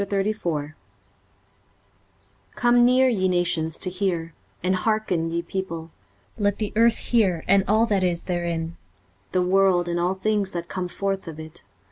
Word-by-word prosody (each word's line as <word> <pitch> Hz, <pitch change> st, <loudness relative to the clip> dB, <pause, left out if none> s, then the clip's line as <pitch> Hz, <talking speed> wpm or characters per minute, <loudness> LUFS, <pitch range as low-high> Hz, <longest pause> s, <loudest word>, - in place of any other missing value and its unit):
23:034:001 195 Hz, -7 st, -2 dB, 1.8 s
Come 240 Hz, 0 st, +4 dB
near, 255 Hz, +2 st, +5 dB
ye 195 Hz, -7 st, +1 dB
nations, 170 Hz, -3 st, 0 dB
to 185 Hz, -, -2 dB
hear; 175 Hz, -4 st, -2 dB, 0.3 s
and 185 Hz, +1 st, +2 dB
hearken, 190 Hz, -6 st, 0 dB
ye 170 Hz, +1 st, -2 dB
people: 170 Hz, -3 st, -5 dB, 0.5 s
let 205 Hz, -1 st, +1 dB
the 210 Hz, -2 st, -3 dB
earth 230 Hz, +1 st, +4 dB
hear, 195 Hz, -9 st, +1 dB
and 195 Hz, 0 st, +5 dB
all 220 Hz, +2 st, +4 dB
that 200 Hz, -4 st, +1 dB
is 175 Hz, -2 st, 0 dB
therein; 170 Hz, -2 st, -3 dB, 0.5 s
the 185 Hz, -, +2 dB
world, 185 Hz, -1 st, +3 dB
and 175 Hz, 0 st, -1 dB
all 180 Hz, +2 st, +1 dB
things 200 Hz, 0 st, 0 dB
that 170 Hz, -1 st, -4 dB
come 185 Hz, +1 st, -3 dB
forth 195 Hz, +1 st, -3 dB
of 160 Hz, -1 st, -7 dB
it. 160 Hz, 0 st, -10 dB
185 Hz, 150 wpm, -24 LUFS, 170-205 Hz, 1.8 s, near